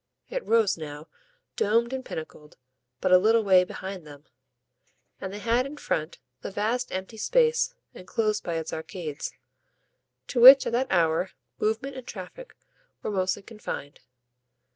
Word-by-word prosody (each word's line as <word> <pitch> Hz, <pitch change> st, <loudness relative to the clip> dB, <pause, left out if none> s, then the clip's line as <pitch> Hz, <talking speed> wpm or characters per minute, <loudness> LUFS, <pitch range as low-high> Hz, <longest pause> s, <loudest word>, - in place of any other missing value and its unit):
It -, -, -3 dB
rose 225 Hz, -6 st, +2 dB
now, 150 Hz, 0 st, -8 dB, 0.5 s
domed 230 Hz, +4 st, +1 dB
and 260 Hz, 0 st, -3 dB
pinnacled, 155 Hz, -6 st, -9 dB, 0.4 s
but -, -, +1 dB
a 180 Hz, -, +8 dB
little 225 Hz, +3 st, +3 dB
way 190 Hz, -2 st, +6 dB
behind 190 Hz, 0 st, -7 dB
them, 145 Hz, -1 st, -13 dB, 1.0 s
and 190 Hz, -, -5 dB
they 205 Hz, -, -6 dB
had 235 Hz, +5 st, +1 dB
in 295 Hz, +2 st, -9 dB
front 160 Hz, -, -3 dB, 0.2 s
the -, -, -5 dB
vast 225 Hz, +5 st, -1 dB
empty 190 Hz, +4 st, -5 dB
space, 475 Hz, -, +2 dB, 0.2 s
enclosed 215 Hz, +3 st, -2 dB
by 170 Hz, -, -3 dB
its 160 Hz, -1 st, -4 dB
arcades, 160 Hz, -2 st, -5 dB, 0.9 s
to 245 Hz, -, -1 dB
which 265 Hz, +2 st, +11 dB
at -, -, -1 dB
that 250 Hz, +3 st, +1 dB
hour 170 Hz, 0 st, +2 dB, 0.3 s
movement 220 Hz, +6 st, -1 dB
and 255 Hz, -, -9 dB
traffic 210 Hz, -, -9 dB, 0.5 s
were -, -, -2 dB
mostly 185 Hz, 0 st, -1 dB
confined. 210 Hz, -10 st, -7 dB
205 Hz, 145 wpm, -26 LUFS, 180-235 Hz, 1.0 s, which